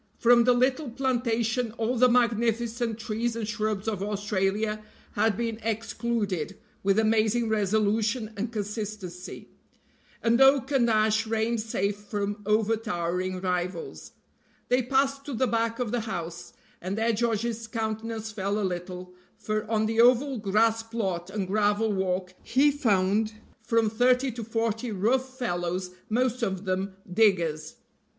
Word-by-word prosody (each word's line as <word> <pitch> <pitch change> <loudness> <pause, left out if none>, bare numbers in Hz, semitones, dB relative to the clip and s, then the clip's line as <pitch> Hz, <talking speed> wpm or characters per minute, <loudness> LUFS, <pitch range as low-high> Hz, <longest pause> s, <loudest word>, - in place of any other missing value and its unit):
From 235 0 +5
the 250 - +5
little 255 +3 +1
plantation 240 -2 0
all 230 +2 -1
the 250 +1 +5
magnificent 235 -1 +1
trees 230 +1 -2
and 225 -2 -3
shrubs 215 -2 -2
of 210 -4 -1
Australia 205 +1 -1 0.3
had 210 0 +1
been 230 -1 -2
excluded 220 -5 -2 0.2
with 195 +1 +2
amazing 220 +1 +2
resolution 215 +2 +1
and 220 +3 -3
consistency, 210 -4 -6 0.7
and 235 +2 +3
oak 270 0 +5
and 250 -4 +3
ash 215 0 +2
reigned 225 +1 0
safe 205 -2 -1
from 205 0 -4
overtowering 185 -4 0
rivals. 180 -1 -3 0.6
They 250 +1 +3
passed 275 +2 +1
to 280 - -4
the 260 - +2
back 230 -1 0
of 245 -4 -2
the 245 - 0
house, 175 -6 -5 0.3
and 185 +3 -3
there 225 +1 +2
George's 230 0 -1
countenance 220 0 -3
fell 200 0 -2
a 205 - 0
little, 180 0 -5 0.2
for 215 0 -3
on 220 -1 +2
the 225 +1 +3
oval 250 +2 +4
grass 220 +3 +2
plot 195 -6 -3
and 195 0 -2
gravel 210 +2 +1
walk 185 -1 -1
he 280 +4 +3
found 215 -5 +1 0.3
from 230 0 +2
thirty 250 +4 +2
to 235 0 -6
forty 225 +1 -2
rough 255 +6 0
fellows, 180 -5 -2 0.2
most 250 +2 +1
of 195 -3 -2
them 190 +1 -2 0.2
diggers. 170 -8 +2
220 Hz, 140 wpm, -27 LUFS, 200-235 Hz, 0.7 s, From